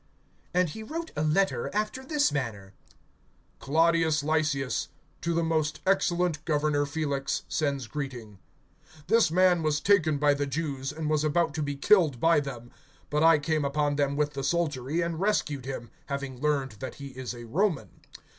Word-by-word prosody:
(25)And 180 Hz, -2 st, +3 dB
he 220 Hz, -, -7 dB
wrote 325 Hz, +8 st, -5 dB
a 150 Hz, -, -1 dB
letter 175 Hz, +6 st, +1 dB
after 215 Hz, +5 st, -1 dB
this 290 Hz, 0 st, +1 dB
manner: 110 Hz, -9 st, -4 dB, 0.9 s
(26)Claudius 160 Hz, +1 st, +2 dB
Lysias 145 Hz, -3 st, 0 dB, 0.3 s
to 170 Hz, -1 st, -1 dB
the 170 Hz, -, +1 dB
most 155 Hz, -2 st, 0 dB
excellent 175 Hz, -4 st, +1 dB
governor 150 Hz, -2 st, +1 dB
Felix, 140 Hz, -2 st, -2 dB
sends 140 Hz, -4 st, -1 dB
greeting. 120 Hz, -7 st, -6 dB, 0.7 s
(27)This 225 Hz, -4 st, +4 dB
man 180 Hz, 0 st, +4 dB
was 155 Hz, -1 st, +1 dB
taken 160 Hz, -4 st, +3 dB
by 145 Hz, 0 st, +4 dB
the 145 Hz, 0 st, -2 dB
Jews, 140 Hz, -2 st, -3 dB
and 155 Hz, -1 st, -4 dB
was 155 Hz, -1 st, +1 dB
about 155 Hz, 0 st, +1 dB
to 155 Hz, -, -3 dB
be 145 Hz, -1 st, -2 dB
killed 155 Hz, -, +3 dB
by 165 Hz, +2 st, +4 dB
them; 125 Hz, -4 st, -7 dB, 0.4 s
but 150 Hz, +1 st, +1 dB
I 165 Hz, 0 st, +6 dB
came 155 Hz, +1 st, 0 dB
upon 145 Hz, +1 st, 0 dB
them 140 Hz, -1 st, 0 dB
with 150 Hz, 0 st, 0 dB
the 135 Hz, -, -4 dB
soldiery, 150 Hz, -1 st, 0 dB
and 170 Hz, -1 st, -2 dB
rescued 150 Hz, -10 st, 0 dB
him, 130 Hz, -3 st, -6 dB, 0.2 s
having 140 Hz, -3 st, -5 dB
learned 140 Hz, -6 st, 0 dB
that 130 Hz, -, -6 dB
he 140 Hz, -1 st, -8 dB
is 130 Hz, -1 st, -6 dB
a 120 Hz, -, -9 dB
Roman. 165 Hz, -, 0 dB
150 Hz, 165 wpm, -28 LUFS, 140-165 Hz, 0.9 s, I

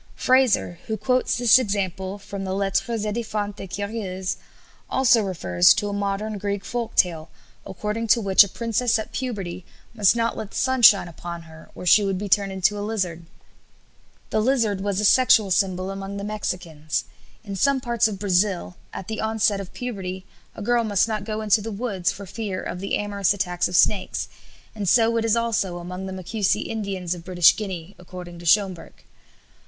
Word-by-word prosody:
Frazer, 255 Hz, -9 st, +2 dB
who 220 Hz, -1 st, -2 dB
quotes 255 Hz, +1 st, +1 dB
this 245 Hz, 0 st, +6 dB
example 195 Hz, -3 st, -2 dB
from 200 Hz, -1 st, -7 dB
the 190 Hz, 0 st, -3 dB
"Lettres 200 Hz, +3 st, -1 dB
édifiantes 210 Hz, -2 st, -3 dB
et 195 Hz, -, -6 dB
curieuses," 195 Hz, -2 st, -4 dB, 0.5 s
also 260 Hz, -3 st, +4 dB
refers 90 Hz, -, +3 dB
to 205 Hz, -1 st, -2 dB
a -, -, -4 dB
modern 200 Hz, +1 st, -2 dB
Greek 200 Hz, 0 st, -3 dB
folk 240 Hz, -2 st, -4 dB
tale, 165 Hz, -3 st, +1 dB, 0.4 s
according 210 Hz, +4 st, -3 dB
to 235 Hz, -, +4 dB
which 195 Hz, -2 st, +6 dB
a -, -, -4 dB
princess 230 Hz, +2 st, 0 dB
at 220 Hz, -, -6 dB
puberty 195 Hz, -9 st, -4 dB, 0.3 s
must 210 Hz, -1 st, +4 dB
not 230 Hz, 0 st, 0 dB
let 215 Hz, -, -6 dB
the -, -, -7 dB
sun 260 Hz, -1 st, +1 dB
shine 200 Hz, -5 st, +7 dB
upon 170 Hz, 0 st, -8 dB
her, 160 Hz, 0 st, -15 dB
or -, -, -8 dB
she 205 Hz, +4 st, +6 dB
would 195 Hz, -1 st, -1 dB
be 205 Hz, +2 st, -4 dB
turned 200 Hz, 0 st, +2 dB
into 190 Hz, +2 st, +1 dB
a -, -, -4 dB
lizard. 185 Hz, -6 st, -3 dB, 1.0 s
The 215 Hz, -, +1 dB
lizard 225 Hz, -5 st, +1 dB
was 200 Hz, -1 st, -1 dB
a 210 Hz, -, +1 dB
sexual 225 Hz, -4 st, +5 dB
symbol 185 Hz, 0 st, 0 dB
among 195 Hz, +1 st, -6 dB
the 200 Hz, -, -5 dB
Mexicans. 180 Hz, -7 st, -3 dB, 0.4 s
In 200 Hz, -3 st, -6 dB
some 275 Hz, +8 st, +2 dB
parts 235 Hz, -3 st, +1 dB
of 210 Hz, -3 st, -5 dB
Brazil 190 Hz, -2 st, 0 dB
at 190 Hz, -, -7 dB
the 220 Hz, -, -4 dB
onset 220 Hz, -2 st, +1 dB
of 190 Hz, -, -10 dB
puberty 190 Hz, -6 st, -5 dB, 0.3 s
a 215 Hz, -, -7 dB
girl 240 Hz, +2 st, +2 dB
must 205 Hz, -1 st, +2 dB
not 215 Hz, -3 st, -3 dB
go 215 Hz, 0 st, -3 dB
into 215 Hz, 0 st, +3 dB
the 225 Hz, +2 st, -5 dB
woods 200 Hz, -4 st, -1 dB
for 200 Hz, -, -9 dB
fear 200 Hz, -1 st, -4 dB
of 180 Hz, -, -5 dB
the 195 Hz, +1 st, -1 dB
amorous 200 Hz, -1 st, 0 dB
attacks 180 Hz, -3 st, -1 dB
of 180 Hz, -, -4 dB
snakes, 195 Hz, +2 st, +2 dB, 0.5 s
and 205 Hz, -4 st, -2 dB
so 230 Hz, +1 st, +4 dB
it 225 Hz, -, 0 dB
is 225 Hz, 0 st, +3 dB
also 225 Hz, -6 st, -1 dB
among 180 Hz, +2 st, -6 dB
the -, -, -6 dB
Macusi 190 Hz, +3 st, -1 dB
Indians 195 Hz, -5 st, -3 dB
of 175 Hz, -2 st, -9 dB
British 175 Hz, -2 st, +5 dB
Guiana, 190 Hz, -3 st, -6 dB
according 180 Hz, -1 st, -10 dB
to 170 Hz, -, -7 dB
Schomburgk. 190 Hz, -2 st, +1 dB
200 Hz, 185 wpm, -23 LUFS, 185-220 Hz, 1.0 s, shine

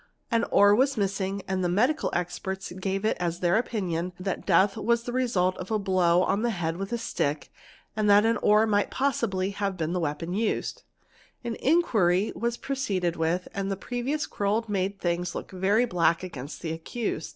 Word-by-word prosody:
An 230 Hz, 0 st, +2 dB
oar 205 Hz, 0 st, +5 dB
was 265 Hz, +4 st, +2 dB
missing 195 Hz, -1 st, -1 dB
and 190 Hz, -1 st, -1 dB
the 175 Hz, -, +1 dB
medical 250 Hz, -, +2 dB
expe 185 Hz, +1 st, -4 dB
gave 195 Hz, +1 st, -1 dB
it 220 Hz, -, +2 dB
as 175 Hz, -1 st, -2 dB
their 175 Hz, -1 st, +2 dB
opinion 185 Hz, -7 st, -1 dB
that 190 Hz, 0 st, -4 dB
death 195 Hz, +2 st, +4 dB
was 235 Hz, +1 st, +1 dB
the 245 Hz, -, -5 dB
result 195 Hz, -8 st, +1 dB
of 185 Hz, -, -7 dB
a 220 Hz, -, +1 dB
blow 185 Hz, -3 st, +3 dB
on 200 Hz, -, +1 dB
the 175 Hz, -9 st, -1 dB
with 195 Hz, +4 st, -5 dB
a 235 Hz, -, 0 dB
stick 145 Hz, -10 st, -2 dB, 0.4 s
and 215 Hz, -1 st, +1 dB
that 205 Hz, +1 st, +6 dB
an 230 Hz, +1 st, +2 dB
oar 210 Hz, +1 st, +4 dB
might 205 Hz, -2 st, +1 dB
probably 220 Hz, -8 st, 0 dB
have 195 Hz, -1 st, -2 dB
been 165 Hz, 0 st, -2 dB
the 180 Hz, -, 0 dB
weapon 165 Hz, +1 st, -3 dB
us 215 Hz, +2 st, -1 dB, 0.7 s
An 235 Hz, -1 st, -3 dB
inquiry 215 Hz, -, +2 dB
was 235 Hz, +1 st, -2 dB
proceeded 195 Hz, -11 st, -1 dB
with 165 Hz, +2 st, -1 dB
and 195 Hz, 0 st, -2 dB
the 195 Hz, -, -2 dB
previous 250 Hz, +8 st, -2 dB
quarrel 210 Hz, +3 st, -1 dB
made 195 Hz, -1 st, -1 dB
thi 175 Hz, 0 st, 0 dB
look -, -, -6 dB
very 195 Hz, +6 st, +2 dB
black 170 Hz, -4 st, +1 dB
against 145 Hz, -6 st, -7 dB
the 160 Hz, -, -2 dB
accused. 165 Hz, +1 st, -4 dB
195 Hz, 185 wpm, -27 LUFS, 180-225 Hz, 0.7 s, that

